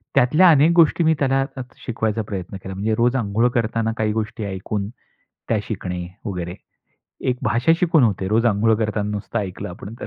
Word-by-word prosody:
त्यातल्या 150 +8 +5
अनेक 155 +2 +5
गोष्टी 170 0 +4
मी 160 0 +4
त्यांना 135 -1 +2 0.4
शिकवायचा 110 -2 -1
प्रयत्न 95 -1 -5
केला. 95 - -6
म्हणजे 110 +3 0
रोज 120 +3 +2
अंघोळ 115 0 +1
करताना 115 -1 0
काही 110 -1 0
गोष्टी 110 0 -3
ऐकून, 100 +1 -4 0.6
त्या 115 - +2
शिकणे 90 -4 -4 0.2
वगैरे. 90 -4 -4 0.8
एक 125 - -2
भाषा 120 +7 +2
शिकून 165 -4 +4
होते 95 -4 0
रोज 115 +3 +2
अंघोळ 110 0 +3
करताना 105 -1 -1
नुसतं 105 +3 -3
ऐकलं 95 -4 -5
आपण 95 +4 -9
तर. - - -5
110 Hz, 175 wpm, -21 LUFS, 100-125 Hz, 0.8 s, त्यातल्या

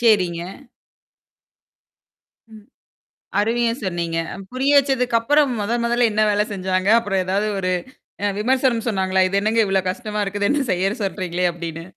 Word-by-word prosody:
சரிங்க. 185 -8 +3 2.1
ம். 215 -1 -14 0.8
அருமையா 230 +2 +1
சொன்னீங்க. 170 -2 -2 0.3
புரிய 265 +3 +1
வச்சதுக்கு 255 -4 +1
அப்புறம் 290 +3 +3
மொத 205 +3 -2
மொதல்ல 240 0 +2
என்ன 215 - +2
வேலை 210 0 +2
செஞ்சாங்க? 185 -1 -1
அப்புறம் 195 -4 -1
ஏதாவது 200 +3 0
ஒரு 185 -1 -1 0.7
விமர்சனம் 250 -1 +1
சொன்னாங்களா? 190 -3 +1
இது 195 - 0
என்னங்க 220 +2 +1
இவ்வளவு 190 -1 0
கஷ்டமா 215 -1 -4
இருக்குது 200 +1 -1
என்ன 290 - +1
செய்யச் 195 +5 -1
சொல்றீங்களே? 180 -2 -2
அப்படின்னு. 165 -1 -6
205 Hz, 130 wpm, -21 LUFS, 185-235 Hz, 2.1 s, சரிங்க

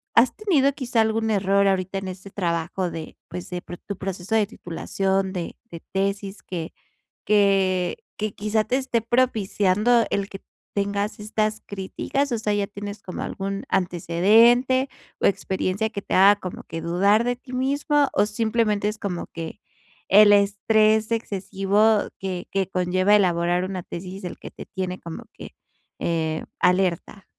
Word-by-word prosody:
¿has 235 +2 +5
tenido 295 -10 +2
quizá 245 -5 0
algún 220 0 +1
error 200 0 +3
ahorita 190 0 0
en 190 - -6
este 190 +1 -8
trabajo 175 0 -1
de, 160 -1 -8
pues, 180 0 -7
de 180 0 -3
pro 175 - -9
tu 200 - -7
proceso 190 +2 -5
de 215 -2 +3
titulación 190 0 -2
de 175 -2 -4
de 170 - -8
tesis 195 +1 -2
que 170 -3 -6 0.5
que 195 -3 +2 0.2
que, 215 -1 -2
quizá, 215 +1 0
te 250 +4 0
esté 260 -3 0
propiciando 225 -1 +2
el 200 0 -1
que 195 - -10 0.3
tengas 200 +1 -1
estas 215 0 -1
críticas. 210 +8 -2
O 230 - 0
sea, 210 -1 -1
ya 205 -1 0
tienes 205 0 -7
como 185 - -6
algún 195 0 -4
antecedente, 220 +9 +3 0.3
o - - +3
experiencia 190 +2 0
que 200 - -5
te - - -3
haga 200 +2 +7
como 185 - -7
que 165 - -6
dudar 200 +6 +3
de 245 0 0
ti 255 +1 -14
mismo, 285 +2 +1
o 205 - +3
simplemente 215 -1 0
es 215 0 -4
como 180 -4 -4
que 165 -1 -7 0.5
el 205 +1 +7
estrés 215 +2 +3
excesivo, 205 0 +1
que 185 -2 -4
que 195 -1 0
conlleva 185 +2 +2
elaborar 175 -1 +2
una 185 -1 -4
tesis 185 +3 -8
el 180 - -6
que - - -9
te - - -10
tiene 185 -2 -4
como 165 -1 -8
que, - - -11 0.5
eh, 160 -2 -1 0.2
alerta? 185 +1 +1
200 Hz, 160 wpm, -24 LUFS, 185-220 Hz, 0.5 s, haga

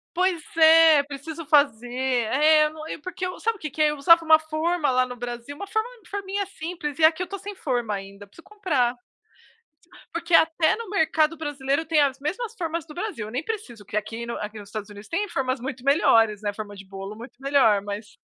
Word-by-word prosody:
Pois 360 -2 +1
é, 320 -2 +7
preciso 295 +3 -7
fazer. 280 -6 +3
É, 265 +5 +3
eu 300 - -3
não 310 0 -10 0.2
porque 370 +1 -5
eu 365 - -6
sabe 455 0 0
o - - -20
que 305 - -5
que 310 +3 -1
é, 300 - +4
eu 300 - -4
usava 335 +4 +5
uma 315 0 +7
forma 315 0 -1
lá 255 0 +2
no 250 - -8
Brasil, 240 +2 -6
uma 400 +7 -7
forma 440 +3 -1 0.2
forminha 400 0 -3
simples, 330 -5 -6
e 315 - +3
aqui 320 +3 +5
eu - - 0
estou 395 +3 -7
sem 405 +2 -7
forma 240 - -2
ainda, 200 +1 -8
preciso 200 +12 -17
comprar. 290 - -1 1.1
Porque 335 0 -2
até 320 0 +4
no 460 -1 -7
mercado 320 -4 +1
brasileiro 290 0 -2
tem 315 -1 +2
as 275 -2 +1
mesmas 440 +10 -4
formas 330 -2 -3
do 300 - -12
Brasil, 360 - -4
eu - - -8
nem 250 +5 -3
preciso 250 - -6
que 205 - -6
aqui 225 +3 -3
no 235 - -4
aqui 210 +1 -6
nos 205 - -11
Estados 210 -1 -6
Unidos 205 +1 -12
tem 405 +5 -1
formas 260 -5 -2
muito 255 0 -6
melhores, 225 -7 +4
né, 205 -1 -1
forma 205 0 -7
de 195 0 -11
bolo 195 +1 -8
muito 235 +4 -11
melhor, 270 -8 +3
mas 205 +1 -7
295 Hz, 215 wpm, -24 LUFS, 235-335 Hz, 1.1 s, é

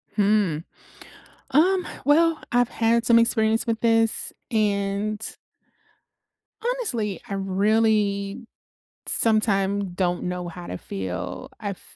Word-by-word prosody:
Hmm. 205 -6 +2 0.9
Um, 360 +5 +3 0.2
well, 325 +2 +4
I've 245 0 +3
had 230 +1 +1
some 235 -1 +6
experience 225 -1 +2
with 225 -1 -1
this. 225 -1 +2 0.2
And 205 -1 0 1.4
honestly, 375 - -1
I 200 - -5
really 200 +2 +1 0.6
sometime 200 -3 +2
don't 175 -1 -1
know 180 0 -3
how 175 +1 -8
to 90 - -5
feel. 95 -2 -5
I've - - -5
215 Hz, 100 wpm, -24 LUFS, 195-230 Hz, 1.4 s, some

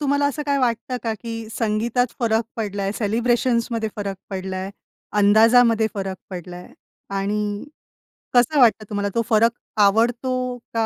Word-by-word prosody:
तुम्हाला 285 0 +2
असं 290 +1 -2
काही 280 -1 +1
वाटतं 250 0 -1
का, 225 -2 -1
की 225 0 -7
"संगीतात 230 +3 +1
फरक 225 -1 +2
पडलाय? 200 -2 -2
सेलिब्रेशन्समध्ये 235 +1 0
फरक 200 -2 -3
पडलाय? 190 0 -4 0.5
अंदाजामध्ये 225 +2 +5
फरक 190 -1 -3
पडलाय? 180 0 -8 0.4
आणि 205 +1 -2 0.7
कसं 250 +4 +4
वाटतं 220 -4 +4
तुम्हाला? 205 -1 -1
तो 230 - +3
फरक 230 +1 +4 0.3
आवडतो 245 +4 +2 0.2
का 225 -1 +1
225 Hz, 125 wpm, -22 LUFS, 205-245 Hz, 0.7 s, अंदाजामध्ये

